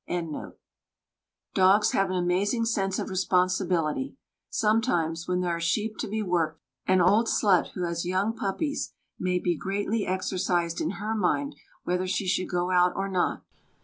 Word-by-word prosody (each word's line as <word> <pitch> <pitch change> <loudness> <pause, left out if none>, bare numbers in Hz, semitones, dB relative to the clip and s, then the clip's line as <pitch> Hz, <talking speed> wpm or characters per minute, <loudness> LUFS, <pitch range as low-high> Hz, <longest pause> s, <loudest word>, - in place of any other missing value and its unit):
Dogs 195 +3 +5
have 195 -1 +1
an 185 - -1
amazing 190 +6 +1
sense 195 -4 0
of - - -3
responsibility. 185 - +1 0.3
Sometimes, 175 -8 +1
when 180 0 0
there 175 -1 0
are - - -4
sheep 210 +6 -1
to - - -2
be 215 +1 -2
worked, 165 -4 0 0.3
an 185 -1 +4
old 205 +6 +4
slut 195 -6 +2
who 180 - -3
has 170 -1 -2
young 190 +5 0
puppies 280 +9 -2 0.2
may 180 0 +1
be 175 -1 0
greatly 200 +5 -2
exercised 180 -2 -1
in - - -1
her 215 +2 -2
mind 225 +8 0 0.3
whether 180 +1 -1
she 190 +1 -1
should 185 0 0
go 180 0 0
out 180 0 +4
or 195 0 -2
not. 185 -2 0
185 Hz, 155 wpm, -27 LUFS, 180-205 Hz, 0.3 s, Dogs